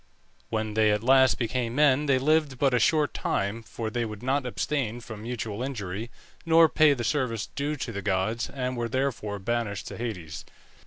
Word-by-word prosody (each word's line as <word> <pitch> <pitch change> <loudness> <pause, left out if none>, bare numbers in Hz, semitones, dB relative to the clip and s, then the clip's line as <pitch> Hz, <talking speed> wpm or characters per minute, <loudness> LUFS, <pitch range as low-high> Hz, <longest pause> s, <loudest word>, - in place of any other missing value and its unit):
When 110 -1 -2
they 110 0 +3
at 105 +1 0
last 130 +1 +5
became 120 0 -2
men 145 0 +4
they 135 -2 +4
lived 150 0 +2
but 135 0 +2
a 125 - +4
short 150 +4 +2
time, 100 +4 -1
for 110 0 -5
they 120 0 -1
would 110 0 -6
not 135 0 0
abstain 125 -2 -2
from 110 -3 -9
mutual 115 -2 -4
injury, 110 -4 -4 0.3
nor 165 0 +6
pay 155 -2 +4
the 120 - -4
service 115 -4 -1
due 145 +2 -3
to 130 -4 -4
the 100 -2 -5
gods, 100 +4 -1
and 130 -2 -3
were 120 -1 -2
therefore 120 -5 -2
banished 115 0 -2
to - - -8
Hades. 90 -10 -5
120 Hz, 190 wpm, -27 LUFS, 110-135 Hz, 0.3 s, nor